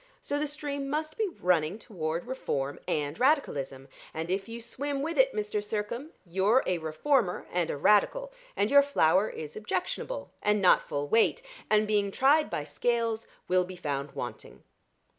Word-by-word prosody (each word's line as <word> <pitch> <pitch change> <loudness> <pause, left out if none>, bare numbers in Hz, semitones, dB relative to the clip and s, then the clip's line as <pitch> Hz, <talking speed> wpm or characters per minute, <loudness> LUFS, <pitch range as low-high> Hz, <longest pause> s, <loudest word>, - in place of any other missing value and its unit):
So 290 - -2
the 300 - 0
stream 285 -1 -4
must 310 +2 -2
be 440 - 0
running 180 - +1
toward 170 -6 -4
Reform 145 - -3
and 145 +1 -1
Radicalism; 140 - +1 0.3
and 165 +2 -3
if 195 +3 -2
you 230 +1 -6
swim 275 +4 -3
with 330 +2 -2
it, - - +5
Mr. 210 0 -2
Sircome, 215 +7 -3 0.2
you're 195 +8 +3
a 180 -2 0
Reformer 180 - 0
and 175 -2 0
a - - -2
Radical, - - +3 0.2
and 205 +2 +1
your 285 0 +8
flour 210 - +3
is 155 -1 -7
objectionable, 215 - -3
and 210 0 +2
not 185 -2 +4
full 145 0 -2
weight 230 - +3 0.3
and 215 0 +4
being 205 -1 +1
tried 285 +8 +3
by 150 - -2
Scales, 225 +8 -1 0.2
will 185 0 +3
be 185 +1 -8
found 145 -4 -3
wanting." - - -7
210 Hz, 165 wpm, -29 LUFS, 170-280 Hz, 0.3 s, your